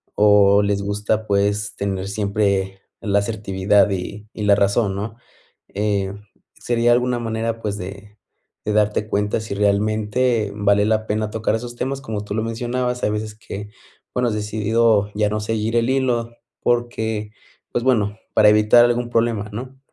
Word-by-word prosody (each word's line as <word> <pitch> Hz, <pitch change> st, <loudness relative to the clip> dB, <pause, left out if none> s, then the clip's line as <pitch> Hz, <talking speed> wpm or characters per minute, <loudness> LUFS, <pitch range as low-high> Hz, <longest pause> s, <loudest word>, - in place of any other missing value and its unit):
o 105 Hz, -1 st, +5 dB
les 100 Hz, 0 st, 0 dB
gusta, 105 Hz, +2 st, -1 dB
pues, 100 Hz, +1 st, 0 dB
tener 95 Hz, -1 st, -3 dB
siempre 100 Hz, -2 st, -1 dB, 0.2 s
la 100 Hz, -1 st, +2 dB
asertividad 100 Hz, -1 st, +1 dB
y 100 Hz, +2 st, -5 dB
y 105 Hz, -, -5 dB
la 100 Hz, -1 st, +5 dB
razón, 100 Hz, 0 st, +1 dB
¿no?, 105 Hz, +3 st, -5 dB, 0.6 s
eh, 100 Hz, -1 st, 0 dB, 0.5 s
sería 120 Hz, 0 st, +2 dB
alguna 125 Hz, 0 st, +1 dB
manera, 115 Hz, 0 st, -3 dB
pues, 105 Hz, -1 st, -3 dB
de 100 Hz, +2 st, -9 dB, 0.5 s
de 105 Hz, -, 0 dB
darte 105 Hz, 0 st, +1 dB
cuenta 105 Hz, +1 st, 0 dB
si 110 Hz, -2 st, -5 dB
realmente 105 Hz, +2 st, +1 dB
vale 100 Hz, 0 st, +3 dB
la 110 Hz, 0 st, +1 dB
pena 105 Hz, 0 st, -1 dB
tocar 110 Hz, 0 st, -1 dB
esos 120 Hz, +1 st, -6 dB
temas, 135 Hz, +3 st, -3 dB
como 110 Hz, -5 st, -4 dB
tú 100 Hz, -, -5 dB
lo 110 Hz, -, 0 dB
mencionabas, 125 Hz, +2 st, -2 dB
hay 105 Hz, -, +2 dB
veces 105 Hz, 0 st, -4 dB
que, 105 Hz, -1 st, -8 dB, 0.4 s
bueno, 125 Hz, -1 st, +1 dB
has -, -, -2 dB
decidido 105 Hz, 0 st, +1 dB
ya 105 Hz, 0 st, +1 dB
no 105 Hz, -, -1 dB
seguir 110 Hz, +1 st, -2 dB
el 115 Hz, 0 st, +2 dB
hilo 120 Hz, -3 st, 0 dB, 0.3 s
porque, 110 Hz, -3 st, -1 dB, 0.4 s
pues, 120 Hz, -, -1 dB
bueno, 105 Hz, -5 st, +1 dB, 0.2 s
para 105 Hz, -1 st, +6 dB
evitar 105 Hz, +3 st, +6 dB
algún 120 Hz, 0 st, 0 dB
problema, 115 Hz, -3 st, 0 dB
¿no? 130 Hz, +4 st, -7 dB
105 Hz, 160 wpm, -21 LUFS, 100-115 Hz, 0.6 s, para